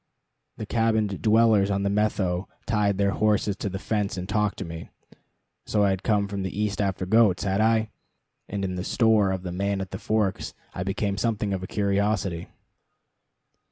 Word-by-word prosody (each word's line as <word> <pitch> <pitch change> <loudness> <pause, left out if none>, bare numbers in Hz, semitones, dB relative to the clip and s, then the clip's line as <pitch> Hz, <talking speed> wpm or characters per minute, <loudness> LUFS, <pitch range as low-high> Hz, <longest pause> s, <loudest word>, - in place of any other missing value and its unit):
The 110 - -5
cabined 110 -3 0
dwellers 110 -2 +4
on 100 0 0
the 100 - +1
Methow 100 -3 0 0.2
tied 105 -3 +1
their 100 0 +2
horses 105 -1 +1
to 100 - -3
the 95 - -4
fence 100 -1 -2
and 90 0 -4
talked 105 0 0
to 95 - -5
me 85 0 -8 0.8
so 105 -1 +2
I 100 - +3
had 95 -1 -2
come 105 -3 +1
from 100 -1 -4
the 95 +2 -4
East 105 -1 0
after 95 -2 -1
goats, 105 -2 +4
had 100 +1 +1
I? 110 0 +2 0.6
and 100 -1 -2
in 95 - -3
the 90 0 -3
store 110 -2 +3
of 95 -1 -3
the 90 - -4
Man 100 +2 -1
at 95 -1 -5
the 95 - -5
Forks 110 -4 -1 0.2
I - - -5
became 100 +1 -1
something 105 -2 0
of 95 - -2
a 95 - -5
curiosity. 100 -3 0
100 Hz, 190 wpm, -25 LUFS, 95-105 Hz, 0.8 s, dwellers